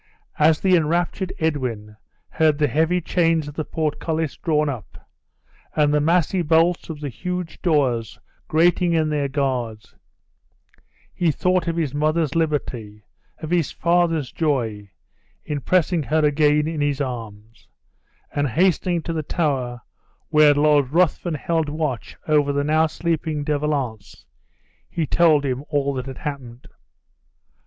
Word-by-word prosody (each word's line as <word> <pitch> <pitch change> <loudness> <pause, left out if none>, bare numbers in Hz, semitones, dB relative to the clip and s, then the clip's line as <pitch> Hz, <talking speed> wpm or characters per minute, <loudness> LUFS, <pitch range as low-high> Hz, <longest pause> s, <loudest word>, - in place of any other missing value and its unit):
As 155 +1 +4
the 185 -1 +3
enraptured 175 +3 0
Edwin 125 -10 -2 0.3
heard 155 -2 +2
the 150 -1 +2
heavy 160 +5 +1
chains 165 -2 +1
of 145 - -7
the 155 - -3
portcullis 160 0 -2
drawn 150 -2 0
up, 125 -7 -7 0.7
and 150 -1 +3
the 150 - +3
massy 175 +3 +2
bolts 165 +2 +2
of 155 -2 -7
the 145 - -3
huge 180 - -5
doors 130 - +1 0.3
grating 175 +2 +3
in 160 -2 +1
their 145 -2 0
guards, 125 -6 -3 1.2
he 175 - +1
thought 180 +2 +1
of 165 - -1
his 155 -5 -1
mother's 155 0 0
liberty, 125 -10 -2 0.4
of 155 - -5
his 170 -5 +1
father's 170 -5 +1
joy, 115 -10 -1 0.6
in 145 -2 -3
pressing 175 0 +2
her 155 +2 +1
again 150 0 +3
in 160 -2 -3
his 145 -1 0
arms; 115 -5 -6 0.7
and 145 0 0
hastening 175 +3 +1
to 165 - -3
the 160 - -1
tower 135 -7 -2 0.5
where 150 -1 +5
Lord 145 -2 +3
Ruthven 170 +1 +1
held 160 +1 -1
watch 145 -8 -3
over 150 -2 +3
the 140 0 0
now 155 +2 +3
sleeping 160 -2 -2
De 145 0 0
Valance, 125 -9 -4 0.6
he 165 -2 -2
told 155 -2 +3
him 130 0 -2
all 140 -2 0
that 130 0 -5
had 135 -2 -7
happened. 130 -4 -7
150 Hz, 140 wpm, -22 LUFS, 140-165 Hz, 1.2 s, where